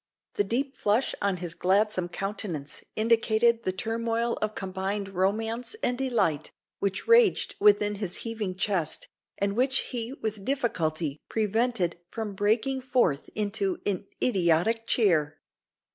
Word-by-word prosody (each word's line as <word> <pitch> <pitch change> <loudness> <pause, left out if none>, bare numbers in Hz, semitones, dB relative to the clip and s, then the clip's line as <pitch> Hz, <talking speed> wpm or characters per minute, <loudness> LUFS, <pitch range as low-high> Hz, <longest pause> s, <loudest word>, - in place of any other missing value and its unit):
The - - +1
deep 265 +7 -1
flush 215 +5 +1
on 200 -2 +1
his 175 -2 -5
gladsome 190 0 +1
countenance 190 -7 -5
indicated 230 +1 +3
the 185 - -1
turmoil 230 +3 -1
of 215 0 -1
combined 195 +1 -3
romance 220 - -1
and 245 - +2
delight 210 - 0 0.3
which 195 0 -2
raged 465 -3 +5
within 210 0 +5
his 180 -3 -2
heaving 220 -5 -2
chest, 185 -5 -1 0.3
and 200 0 0
which 260 +3 +3
he 240 0 -1
with 215 -6 -4
difficulty 165 - -1
prevented 220 -4 0
from 220 -3 -4
breaking 220 +7 +1
forth 240 - +1
into 220 - -1
an 200 -1 -1 0.2
idiotic 200 +2 +2
cheer. 155 -11 +2
210 Hz, 130 wpm, -27 LUFS, 185-230 Hz, 0.3 s, raged